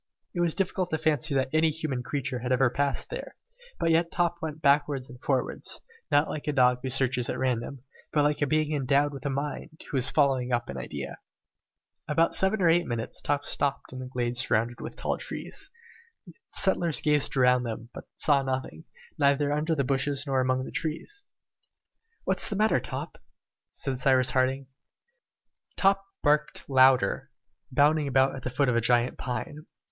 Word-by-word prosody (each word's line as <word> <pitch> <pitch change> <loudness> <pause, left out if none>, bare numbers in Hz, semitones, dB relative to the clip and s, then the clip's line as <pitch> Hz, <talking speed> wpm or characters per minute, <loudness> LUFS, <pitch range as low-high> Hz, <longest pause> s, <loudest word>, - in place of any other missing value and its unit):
It 175 - -4
was 170 -2 +1
difficult 185 -1 -1
to 160 - 0
fancy 155 -2 0
that 130 -1 +1
any 160 0 +4
human 155 -5 -3
creature 130 -1 -3
had 125 +2 -4
ever 130 -1 +3
passed 140 +1 -2
there, - - -6 0.4
but 165 - +2
yet 165 +1 +2
Top 175 -1 0
went 155 -1 -4
backwards 140 -3 +2
and 125 0 -13
forwards, 135 -3 -2 0.3
not 145 +2 +3
like 150 - -6
a 150 - +1
dog 125 -2 +4
who 130 - -3
searches 125 -1 0
at - - -2
random, 130 0 -2 0.3
but 150 - +2
like 150 0 +1
a 145 - +2
being 155 +1 +1
endowed 140 +1 +2
with 140 +1 -5
a - - 0
mind, 145 +3 -5
who 140 - 0
is 130 0 +4
following 135 -4 +2
up 120 -1 0
an 70 - -5
idea. - - -6 0.9
In 150 - -1
about 165 +2 +3
seven 190 +1 +1
or - - +5
eight 170 +1 +3
minutes 115 -2 -4
Top 145 0 -1
stopped 140 -2 -1
in 130 - -6
a 130 - -6
glade 120 -1 -2
surrounded 120 0 +1
with - - -7
tall - - -2
trees. - - -4 0.6
The 175 - -13
settlers 175 -5 +2
gazed 150 -2 +1
around 125 -1 +4
them, 115 0 -6
but - - -9
saw 145 -3 +4
nothing, 130 -12 -4 0.3
neither 145 +1 +3
under 155 +2 0
the 140 - +1
bushes 140 +1 0
nor 135 -2 +1
among 130 0 0
the - - -8
trees. 165 - -4 1.0
"What - - -1
is - - -1
the 205 - -2
matter, 215 +2 +3
Top?" - - -7 0.5
said 135 -2 -4
Cyrus 130 -1 +3
Harding. 130 +1 +1 1.1
Top 195 0 +3 0.2
barked 150 0 +1
louder, 130 -5 +4 0.4
bounding 145 +3 +3
about 135 0 +3
at 135 - -7
the 130 - -3
foot 135 +2 +1
of 125 - +2
a 115 - +3
gigantic 120 +1 +2
pine. 130 +6 -5
140 Hz, 185 wpm, -27 LUFS, 130-155 Hz, 1.1 s, or